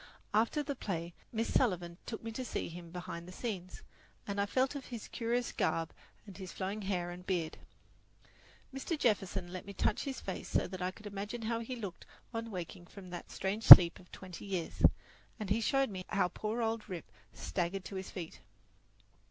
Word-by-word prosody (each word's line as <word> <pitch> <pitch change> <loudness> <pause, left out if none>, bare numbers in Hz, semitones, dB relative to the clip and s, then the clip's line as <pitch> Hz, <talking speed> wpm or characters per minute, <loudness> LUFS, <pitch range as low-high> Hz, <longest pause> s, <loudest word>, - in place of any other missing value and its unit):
After 230 +8 +2
the 285 0 -3
play 175 -9 -4 0.2
Miss 225 0 -2
Sullivan 180 -8 +1
took 225 - -5
me 225 - -4
to 255 +3 -4
see 240 - -3
him 170 0 -9
behind 170 0 -7
the - - -9
scenes, 185 -3 -5 0.4
and 200 0 -1
I 200 - 0
felt 260 +5 +1
of 280 -2 -6
his 235 -4 -7
curious 240 +1 -1
garb 165 -1 -1 0.3
and 200 -3 -11
his 185 -3 -8
flowing 195 +3 -4
hair 180 -3 -2
and 180 +1 -9
beard. 175 -4 -2 1.1
Mr. 270 +5 -3
Jefferson 195 -7 0
let 185 - -5
me 200 - -7
touch 205 - 0
his 270 -3 -4
face 190 - -6
so - - +2
that 185 0 -7
I 180 - 0
could 210 +3 -13
imagine 205 +3 -5
how 230 +1 -1
he 230 +2 -5
looked 200 -7 -7 0.3
on 230 0 -4
waking 175 -2 -7
from 185 -2 -11
that 175 - -7
strange 200 +4 -3
sleep 170 -2 +13
of 180 - -18
twenty 185 -1 -9
years, 185 -4 -4 0.6
and 205 -3 -4
he 225 +3 +2
showed 270 +1 +2
me 185 -1 -5
how 195 -3 +2
poor 220 +5 -3
old 225 -1 -2
Rip 180 -3 -5 0.3
staggered 185 +1 -3
to 195 - -7
his 190 0 -5
feet. 175 -4 -7
195 Hz, 195 wpm, -33 LUFS, 180-225 Hz, 1.1 s, sleep